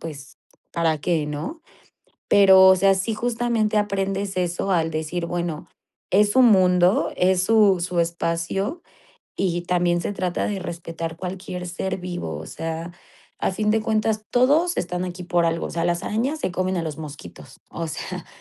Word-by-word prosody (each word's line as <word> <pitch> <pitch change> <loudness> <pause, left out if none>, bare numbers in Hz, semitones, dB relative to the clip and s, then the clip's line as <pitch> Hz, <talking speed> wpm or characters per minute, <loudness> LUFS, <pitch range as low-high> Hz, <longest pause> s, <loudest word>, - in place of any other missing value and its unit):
pues, 145 -3 -9 0.3
para 165 -2 +1
qué, 160 -1 0
¿no? 155 - -5 0.7
Pero, 190 -1 +7
o 190 0 +7
sea, 195 +1 +4
sí 190 +4 -1
justamente 230 -2 0
aprendes 195 -1 -1
eso, 180 +2 -1
al 165 -3 +1
decir 160 +2 -3
bueno, 170 -2 -3 0.4
es 205 +2 +4
su 260 - +5
mundo, 185 -5 +4
es 180 0 +3
su 205 -3 +4
su 175 0 0
espacio 170 - -2 0.5
y 175 -2 0
también 175 -1 +1
se 205 - -2
trata 180 -2 -2
de 200 -2 -2
respetar 165 -2 -6
cualquier 180 0 -6
ser 185 +2 -3
vivo, 175 - -5
o 80 - -8
sea, 165 +1 -5 0.5
a - - 0
fin 210 +2 0
de 220 - +2
cuentas 215 0 0
todos 295 +8 +3
están 180 +1 -2
aquí 180 0 -6
por 175 -1 +1
algo, 165 0 -1
o - - -7
sea, 165 0 -2
las 175 0 0
arañas 255 +9 -1
se - - -1
comen 185 +1 -1
a 170 - -1
los 155 -1 -5
mosquitos, 150 0 -10
o 165 -1 -4
sea, 155 - -6
180 Hz, 170 wpm, -23 LUFS, 170-205 Hz, 0.7 s, Pero